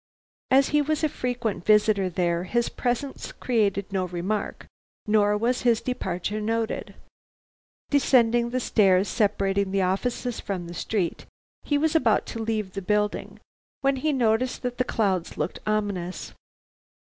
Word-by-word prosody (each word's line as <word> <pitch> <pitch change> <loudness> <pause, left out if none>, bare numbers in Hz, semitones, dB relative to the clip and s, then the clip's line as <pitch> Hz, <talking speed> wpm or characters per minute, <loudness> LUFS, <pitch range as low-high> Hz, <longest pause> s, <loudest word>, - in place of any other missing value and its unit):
As 270 +1 +4
he 295 0 +3
was 310 +1 -1
a 310 - +3
frequent 245 -8 -3
visitor 210 -2 +3
there, 175 0 0
his 235 +5 0
presence 250 +2 -3
created 205 -5 0
no 190 -1 0
remark 180 +4 -3 0.4
nor 210 -1 +3
was 240 +4 0
his 235 -3 +3
departure 205 -4 -3
noted. 225 +1 -2 1.0
Descending 240 -4 +3
the 255 +1 -1
stairs 195 -5 +3
separating 200 -1 +1
the 195 0 +1
offices 235 +6 -1
from 185 -3 -4
the 170 - -8
street, 185 -1 -2 0.3
he 290 - 0
was 315 +2 +1
about 235 -9 +3
to 230 - -4
leave 215 -3 -2
the 195 - -4
building, 210 +2 -1 0.4
when 275 -1 +2
he 305 +4 0
noticed 245 -1 +1
that 245 0 -3
the - - +4
clouds 195 -8 -1
looked 150 +4 -3
ominous. 200 -4 -2
215 Hz, 145 wpm, -25 LUFS, 195-245 Hz, 1.0 s, As